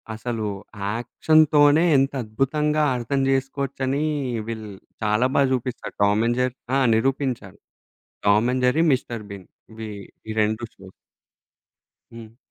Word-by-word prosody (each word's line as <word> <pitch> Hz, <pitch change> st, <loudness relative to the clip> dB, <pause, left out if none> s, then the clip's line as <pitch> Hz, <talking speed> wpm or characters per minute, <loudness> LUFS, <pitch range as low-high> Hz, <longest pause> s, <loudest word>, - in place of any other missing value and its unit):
అసలు 115 Hz, -1 st, -4 dB, 0.4 s
యాక్షన్‌తోనే 145 Hz, +6 st, +3 dB
ఎంత 135 Hz, +1 st, +1 dB
అద్భుతంగా 150 Hz, +7 st, 0 dB
అర్థం 135 Hz, +3 st, -1 dB
జేసుకోవచ్చనీ, 135 Hz, +1 st, -1 dB, 0.4 s
వీళ్ళు 110 Hz, -2 st, -6 dB, 0.3 s
చాలా 105 Hz, +4 st, +2 dB
బాగా 135 Hz, -2 st, +4 dB
జూపిస్తాడు 125 Hz, 0 st, -4 dB
టామ్ 105 Hz, +2 st, +3 dB
అండ్ 120 Hz, +1 st, 0 dB
జెర్రీ 125 Hz, 0 st, -1 dB, 0.2 s
ఆ! -, -, +3 dB, 0.2 s
నిరూపించారు. 125 Hz, -5 st, -1 dB, 0.7 s
Tom 105 Hz, +4 st, +4 dB
and 130 Hz, 0 st, -1 dB
Jerry, 155 Hz, +7 st, +3 dB
mister 120 Hz, -4 st, -2 dB
been 95 Hz, -2 st, -10 dB, 0.2 s
ఇవి, 110 Hz, 0 st, -7 dB, 0.4 s
ఈ -, -, -3 dB
2 110 Hz, +2 st, -1 dB
షోస్. 95 Hz, -1 st, -14 dB, 1.2 s
హ్మ్. 115 Hz, -1 st, -12 dB
125 Hz, 120 wpm, -23 LUFS, 110-135 Hz, 1.2 s, బాగా